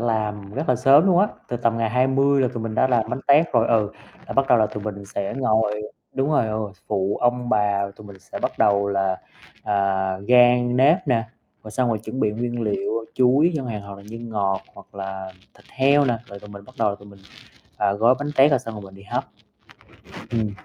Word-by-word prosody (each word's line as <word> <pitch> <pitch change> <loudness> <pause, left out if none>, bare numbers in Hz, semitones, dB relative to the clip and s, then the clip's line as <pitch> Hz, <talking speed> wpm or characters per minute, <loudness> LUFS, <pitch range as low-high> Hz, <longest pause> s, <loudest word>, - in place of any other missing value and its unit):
làm 105 -3 -2
rất 160 - -3
là 125 - +3
sớm 140 +8 +5
luôn 180 -2 +4
á, 200 - +5 0.2
từ 120 - -2
tầm 115 -1 0
ngày 115 -1 0
20 135 +3 +2
là 130 - +2
tụi 115 - -4
mình 110 -1 -4
đã 130 - +3
làm 120 -4 0
bánh 135 - -3
tét 150 +4 +4
rồi, 115 - +3
ừ, 110 -3 +2 0.4
là - - -6
bắt 135 0 +2
đầu 125 - +5
là 110 - +3
tụi 105 0 -7
mình 100 -1 -6
sẽ 100 0 -4
ngồi 110 -4 +1 0.3
đúng 135 +2 0
rồi, 145 -7 +2
ờ, 110 0 -2 0.3
phụ 100 -1 0
ông 120 0 +1
bà, 100 -3 +1
tụi 105 - -13
mình 100 -2 -12
sẽ - - -9
bắt - - -1
đầu 100 -1 +3
là, 95 -1 0 0.5
à, 105 - -2 0.5
rang 125 0 +5
nếp 140 +6 +5
nè, 115 -3 +2 0.4
rồi 110 - -8
xong 125 +3 0
rồi 115 -2 0
chuẩn 110 +4 -6
bị 110 - +2
nguyên 120 +2 -3
liệu 110 +1 -2
chuối 135 +7 +3
chẳng 135 -3 -4
hạn 110 -3 -4
hoặc 100 0 -9
là 100 - -13
nhân 115 +1 -8
ngọt 100 -3 -1
hoặc - - -16
là 95 -1 -6 0.2
thịt - - -22
heo 140 +2 +3
nè, 120 -4 0
rồi 100 -3 -10
tụi 105 - -13
mình 100 0 -11
bắt - - -17
đầu 105 - +2
là - - -3
tụi 100 - -15
mình, 100 -1 -16 0.6
ờ, 100 - +1
gói 115 +4 +4
bánh 145 +1 -3
tét 135 +3 +6
rồi - - +3
xong 115 - -8
rồi 105 - -8
mình 95 -1 -12
đi 100 - -14
hấp. 105 - -3 1.1
Ừm. 110 -3 -1
115 Hz, 235 wpm, -22 LUFS, 100-125 Hz, 1.1 s, tét